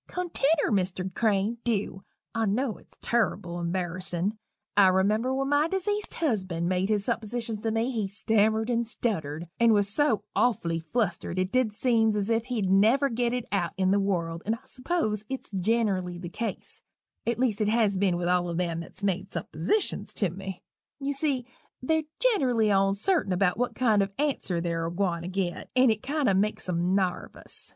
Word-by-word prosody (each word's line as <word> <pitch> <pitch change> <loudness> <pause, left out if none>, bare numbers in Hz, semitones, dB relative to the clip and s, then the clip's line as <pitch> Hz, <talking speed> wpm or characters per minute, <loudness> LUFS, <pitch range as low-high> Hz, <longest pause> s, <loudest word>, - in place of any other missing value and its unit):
"Continner, 330 -5 0
Mr. 185 -1 -1
Crane 215 +1 +1
dew 205 -4 -1 0.3
I 225 -1 0
knew 225 +3 0
it's - - -21
turrible 180 -7 0
embarrissin'. 180 +2 -2 0.4
I 200 -2 +7
remember 205 +7 +2
when 270 +1 -1
my 290 +2 +3
dezeased 410 +3 -2
husband 185 - -1
made 185 +2 0
his 205 -2 +1
suppositions 230 -1 -2
to 225 - -1
me 225 +3 0
he 220 -5 -1
stammered 220 +2 +2
and 235 -1 +1
stuttered, 165 -9 -2
and 235 -1 +5
was 205 -1 +3
so 220 -1 +2
awfully 170 -9 +1
flustered 175 0 -2
it 185 +1 0
did 250 -5 +1
seems 225 -3 +2
as 205 +2 0
if 225 0 +1
he'd 235 -6 -1
never 225 +9 +4
git 240 0 0
it 245 -1 -2
out 180 -5 0
in 190 0 +2
the 200 - +3
world, 170 -4 -1
and 220 +2 0
I 255 +3 -17
s'pose 255 - -2
it's 265 -4 -6
ginnerally 195 -3 0
the 175 -1 -6
case, 230 +5 -5 0.5
at 235 -1 +1
least 235 -4 +1
it 210 - +2
has 215 -3 +2
been 185 -2 +2
with 175 0 -2
all 175 -1 +1
them 170 -1 -1
that's 170 +4 -10
made 195 -1 -1
suppositions 170 - -2
to 195 -6 +1
me 190 0 -7 0.4
you 280 0 -1
see 275 -3 0 0.3
they're 315 +3 0
ginerally 260 - +3
oncerting 195 - +2
about 180 0 +2
what 245 - -1
kind 220 -5 +3
of 195 - 0
an 295 - +2
answer 180 -10 -2
they're 165 -1 -1
a - - -4
gwine 175 -2 -1
to 170 - -6
git, 185 -1 -3
and 255 -2 +6
it 215 -1 -2
kind 290 0 -1
o' 195 - +4
makes 205 +2 0
'em 180 +1 +1
narvous. 185 -2 -2
210 Hz, 185 wpm, -27 LUFS, 185-240 Hz, 0.5 s, I